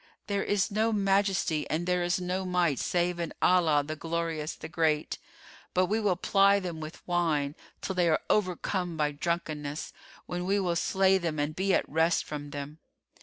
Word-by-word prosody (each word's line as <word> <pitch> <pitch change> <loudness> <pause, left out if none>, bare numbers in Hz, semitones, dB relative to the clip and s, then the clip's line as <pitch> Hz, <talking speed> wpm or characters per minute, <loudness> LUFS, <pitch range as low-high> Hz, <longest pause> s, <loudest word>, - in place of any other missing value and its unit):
There 200 -1 -1
is 205 -2 +1
no 220 +2 +1
Majesty 195 -6 +1
and 165 +3 -1
there 180 0 +1
is 175 +1 +1
no 180 +1 -2
Might 180 -6 +1
save 175 0 0
in 170 -2 -4
Allah, 165 -5 +4
the 155 +1 -4
Glorious, 165 -1 -3
the - - -8
Great! 160 -2 0 0.6
But 185 0 +4
we 215 +4 0
will 205 -4 +2
ply 200 +2 +4
them 175 -4 -5
with 155 +1 -9
wine, 160 -5 +1 0.3
till 190 - -3
they 175 -2 +2
are - - +2
overcome 180 -3 0
by 150 -1 +1
drunkenness, 150 -1 -3 0.3
when 175 0 -4
we 200 +2 +2
will 180 -3 0
slay 190 +2 +3
them 165 -3 -2
and 145 +1 -1
be 195 +2 +1
at - - 0
rest 160 +3 +2
from 145 -1 -6
them. 145 +2 -7
175 Hz, 180 wpm, -29 LUFS, 155-190 Hz, 0.6 s, Allah